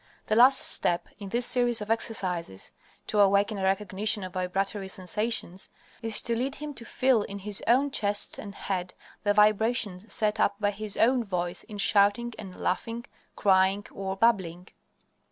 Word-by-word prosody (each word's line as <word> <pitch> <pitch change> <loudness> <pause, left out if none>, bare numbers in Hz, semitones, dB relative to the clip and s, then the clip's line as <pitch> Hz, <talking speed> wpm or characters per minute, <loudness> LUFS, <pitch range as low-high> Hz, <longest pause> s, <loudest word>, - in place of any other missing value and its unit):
The 215 - 0
last 255 +4 +6
step 175 0 +1
in 200 -2 -8
this 240 +4 0
series 245 -2 +3
of 210 +1 -4
exercises 180 - -2 0.3
to 210 - -1
awaken 200 +1 +3
a - - -4
recognition 200 +1 +1
of 185 -1 -8
vibratory 195 +2 -2
sensations 190 0 -2 0.3
is 225 -2 +4
to 235 - 0
lead 265 +4 -2
him 300 0 -7
to 235 -3 -10
feel 255 -3 +1
in 200 0 -6
his 200 0 +2
own 265 +5 +3
chest 205 -4 +1
and 200 -2 -9
head 185 -2 -4 0.3
the 205 -1 0
vibrations 215 -1 +1
set 215 0 +2
up 205 - +2
by 205 -1 0
his 210 0 -4
own 245 +1 +3
voice 175 -4 -4
in 210 -3 -10
shouting 205 +4 +2
and 185 -2 -9
laughing, 230 +6 -3 0.3
crying 195 0 +2
or 190 0 -5
babbling. 185 -5 0
205 Hz, 165 wpm, -27 LUFS, 190-230 Hz, 0.3 s, last